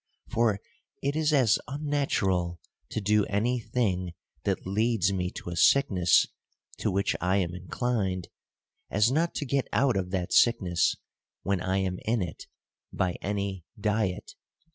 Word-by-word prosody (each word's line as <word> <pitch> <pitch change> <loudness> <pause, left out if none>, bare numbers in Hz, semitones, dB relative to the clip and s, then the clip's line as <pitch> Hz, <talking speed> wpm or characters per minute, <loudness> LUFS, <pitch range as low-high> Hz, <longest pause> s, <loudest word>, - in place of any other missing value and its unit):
For 110 -4 +2 0.4
it 140 +1 0
is 155 -1 +2
as 130 -7 +4
unnatural 120 - 0 0.3
to - - -2
do 105 0 +3
any 115 +5 0
thing 95 -7 -1 0.3
that 100 -2 -1
leads 100 0 +1
me 90 -1 -1
to 85 - -7
a - - -4
sickness 90 -4 +4 0.5
to - - -1
which 100 +2 0
I 95 +2 +2
am 90 -3 0
inclined, 95 -1 -2 0.6
as 105 +4 +3
not 165 +4 +1
to 145 - -2
get 135 -1 0
out 130 +4 +2
of 95 -2 -1
that 90 -2 -2
sickness 90 -8 +3 0.5
when 100 -2 0
I 95 +2 0
am 95 -1 -1
in 110 -2 +1
it, 80 -4 -7 0.4
by 90 -2 -1
any 100 -2 -3 0.2
diet. 105 -3 -1
100 Hz, 145 wpm, -28 LUFS, 90-120 Hz, 0.6 s, as